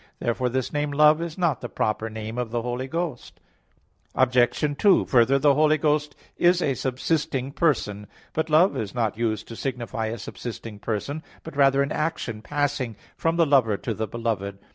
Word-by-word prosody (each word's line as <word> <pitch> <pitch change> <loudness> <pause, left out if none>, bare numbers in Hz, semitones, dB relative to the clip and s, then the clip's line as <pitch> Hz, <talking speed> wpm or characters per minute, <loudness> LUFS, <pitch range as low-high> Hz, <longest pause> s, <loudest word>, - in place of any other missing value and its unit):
Therefore 125 +2 -1
this 130 0 -2
name, 150 0 0
"Love," 150 +2 +5
is 170 -2 -5
not 170 -8 +1
the - - -5
proper 110 +1 -1
name 110 +2 -5
of 120 -2 -2
the 115 0 -2
Holy 125 +2 -3
Ghost. 165 -4 -4 0.8
Obj. 130 +3 +2
2: 200 -3 +5
Further, 125 +2 +4
the 140 +1 +4
Holy 155 +2 +4
Ghost 150 0 0 0.2
is 175 +1 +4
a 140 -6 +1
subsisting 135 +1 -1
person, 105 - 0 0.3
but 160 +1 -1
love 160 +6 +4
is 105 0 -4
not 115 -4 0
used 110 -2 -1
to 115 - -7
signify 120 -3 -3
a 115 +2 -4
subsisting 115 -1 -7
person, 110 +8 -3 0.2
but 160 - -9
rather 140 -1 +4
an 140 - -4
action 150 -8 -2
passing 140 -3 -1 0.2
from 165 0 0
the 170 -1 +4
lover 130 -8 +3
to 115 - -3
the 110 +1 -3
beloved. 105 -3 -3
130 Hz, 180 wpm, -25 LUFS, 115-150 Hz, 0.8 s, Love